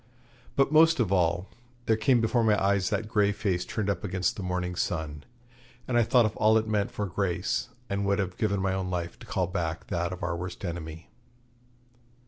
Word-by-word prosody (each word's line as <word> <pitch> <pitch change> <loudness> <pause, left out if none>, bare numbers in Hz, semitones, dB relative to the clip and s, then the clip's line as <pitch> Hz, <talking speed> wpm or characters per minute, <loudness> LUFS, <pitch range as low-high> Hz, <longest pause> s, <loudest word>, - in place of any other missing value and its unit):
But, 135 +1 +3
most 160 0 +6
of 110 -6 +1
all, 90 0 +2 0.4
there 110 - +3
came 120 +2 +3
before 115 +1 +2
my 105 -2 +3
eyes 100 -1 +2
that 110 - -1
grey 105 -2 +2
face 95 -3 -1
turned 100 +2 -3
up 100 - -1
against 95 +4 -1
the 105 - -6
morning 90 -1 -2
sun, 80 -5 -3 0.6
and 125 - -1
I 120 - +5
thought 120 +1 +4
of 110 - -2
all 110 0 +5
it 110 0 0
meant 105 -2 0
for 105 - -3
Grace, 100 +5 -1 0.2
and 100 0 -1
would 100 0 +2
have 95 -3 -2
given 100 -3 0
my 95 -1 +1
own 95 -1 -2
life 85 -2 -4
to - - -12
call 95 - 0
back 85 -3 -3
that 85 0 -1
of 90 +2 -7
our 85 - -1
worst 90 +3 -6
enemy. 80 -1 -6
100 Hz, 205 wpm, -28 LUFS, 90-110 Hz, 0.6 s, most